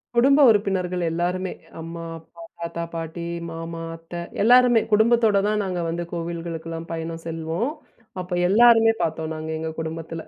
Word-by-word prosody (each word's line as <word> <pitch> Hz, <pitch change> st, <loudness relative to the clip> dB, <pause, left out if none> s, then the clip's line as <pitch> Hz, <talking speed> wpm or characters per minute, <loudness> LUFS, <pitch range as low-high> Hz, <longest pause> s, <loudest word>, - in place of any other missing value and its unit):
குடும்ப 275 Hz, +4 st, +5 dB
உறுப்பினர்கள் 185 Hz, -4 st, +1 dB
எல்லாருமே. 180 Hz, +3 st, -1 dB, 0.3 s
அம்மா, 165 Hz, +1 st, -7 dB, 0.2 s
அப்பா, 165 Hz, +1 st, -16 dB, 0.2 s
தாத்தா, 170 Hz, 0 st, -4 dB
பாட்டி, 165 Hz, +1 st, -5 dB, 0.3 s
மாமா, 165 Hz, 0 st, -6 dB
அத்த 165 Hz, +1 st, -15 dB, 0.3 s
எல்லாருமே 245 Hz, 0 st, +6 dB
குடும்பத்தோடு 220 Hz, -1 st, +4 dB
தான் 210 Hz, 0 st, +1 dB
நாங்க 180 Hz, -2 st, -2 dB
வந்து 170 Hz, +1 st, -3 dB
கோவில்களுக்கெல்லாம் 165 Hz, -1 st, -5 dB
பயணம் 165 Hz, 0 st, -5 dB
செல்வோம். 165 Hz, -, -2 dB, 0.5 s
அப்போ 180 Hz, 0 st, -6 dB, 0.2 s
எல்லோருமே 225 Hz, +1 st, +6 dB
பாத்தோம் 160 Hz, -1 st, -2 dB
நாங்க 155 Hz, 0 st, -6 dB
எங்க 160 Hz, 0 st, -3 dB
குடும்பத்தில. 165 Hz, 0 st, -5 dB
170 Hz, 135 wpm, -23 LUFS, 165-205 Hz, 0.5 s, எல்லாருமே